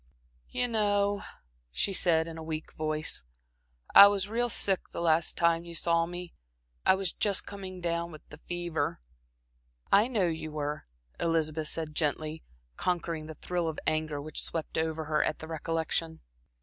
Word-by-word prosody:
"You 250 - 0
know," 205 -3 +1 0.5
she 65 - -1
said, 165 -3 +3
in 165 -1 -7
her - - -6
weak 160 0 -5
voice 155 - -1 0.7
"I 200 - +12
was 200 -1 0
real 240 +3 0
sick 195 -3 +2
that - - -6
last 165 -1 +2
time 170 0 +3
you 170 -1 -8
saw 165 0 +2
me. 175 0 -7 0.5
I 190 - +7
was 190 -3 -2
just 200 -2 +1
coming 190 -2 -7
down 170 0 -1
with 155 - -13
the 150 - -11
fever." 175 - -2 0.9
"I 205 +4 +6
know 220 -7 +1
you 160 -2 -3
were," 150 0 -3 0.3
Elizabeth 160 -2 0
said 155 -1 -3
gently, 155 +1 -1 0.4
conquering 165 -3 -1
the 160 - -8
thrill 175 +2 -2
of 160 - -3
anger 155 -2 0
which 150 +1 -2
swept 160 -2 -4
over 160 0 -1
her 150 0 +2
at 155 - -1
the 160 - -9
recollection. 160 0 -2
165 Hz, 160 wpm, -30 LUFS, 155-180 Hz, 0.9 s, I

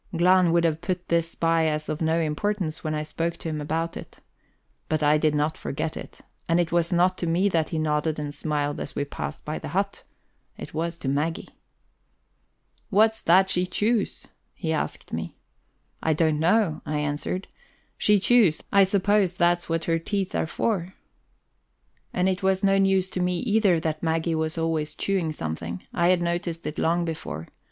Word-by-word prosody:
Glahn 180 0 +5
would 170 0 +3
have 160 -1 +1
put 180 0 -3
this 170 0 +1
by 165 -1 +2
as 150 0 -2
of 155 - -3
no 160 +1 +2
importance 165 +1 -2
when 155 -1 -1
I 150 - -2
spoke 165 +2 -3
to 165 - -5
him 155 -1 -3
about 165 +3 -2
it. - - -10 0.7
But 155 -1 0
I 150 +1 +4
did 150 -1 +2
not 150 +2 0
forget 155 +2 -3
it. - - -9 0.3
And 165 +1 +3
it 170 -2 0
was 170 0 +1
not 180 +1 +2
to 175 - -2
me 180 +5 +2
that 165 -4 0
he 165 - -3
nodded 155 0 0
and 145 -1 -4
smiled 145 -1 -2
as - - -6
we 145 - -1
passed 75 - -6
by - - -3
the - - -7
hut! - - -2 0.6
it - - -9
was 165 +2 -2
to 145 - -6
Maggie. 150 +5 -1 1.4
"What's 220 +1 +3
that 190 +3 +4
she 180 0 +1
chews?" 215 +2 -1 0.3
he 160 -3 -2
asked 155 - -4
me. 80 +1 -4 0.7
"I 160 - +2
don't 155 -1 +1
know," 170 -1 +2
I 150 - -2
answered. 150 +6 -2 0.5
"She 210 -1 +3
chews 200 -5 +4
I 200 -1 +6
suppose 195 -1 +2
that's 175 -1 +2
what 165 0 0
her 165 0 +1
teeth 195 +2 -2
are - - 0
for." 190 0 -2 1.2
And 180 +1 +1
it 185 -1 0
was 190 0 +1
no 195 0 +4
news 195 -1 +3
to - - -3
me 180 0 +1
either 210 -7 +3
that 155 -1 -2
Maggie 165 0 0
was 160 +1 -1
always 160 -2 -1
chewing 190 -5 0
something; 85 - -5
I 170 0 +2
had 180 -1 +3
noticed 170 -1 -2
it 150 - -4
long 170 +1 +1
before. 80 - -5
165 Hz, 185 wpm, -25 LUFS, 155-185 Hz, 1.4 s, I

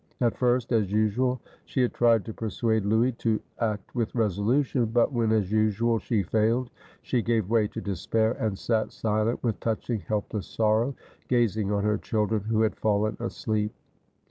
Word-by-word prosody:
At 120 -3 +2
first, 125 -1 +1
as 105 -5 +2
usual, 110 +5 +1 0.3
she 130 - -1
had 125 - 0
tried 115 -3 +3
to 110 - -6
persuade 110 -1 -1
Louis 115 +4 +3
to 110 -2 +1 0.2
act 105 -4 -2
with 115 -2 -2
resolution; 115 +4 +1
but 120 +5 +2
when, 115 -2 +1
as 105 -3 +1
usual, 110 +2 +2
she 110 -3 0
failed, 115 +6 +1 0.3
she 125 - 0
gave 110 -3 0
way 110 -3 +3
to 110 - -7
despair, 110 +3 0
and 105 -3 -1
sat 110 +1 0
silent, 110 +1 -1
with 115 -4 -1
touching 115 0 -2
helpless 105 +2 -3
sorrow, 115 +4 +1 0.3
gazing 110 -4 +1
on 100 -1 0
her 105 -1 +1
children, 110 -1 0
who 110 0 +2
had 110 - 0
fallen 105 0 +1
asleep. 110 -2 -2
110 Hz, 170 wpm, -27 LUFS, 105-115 Hz, 0.3 s, tried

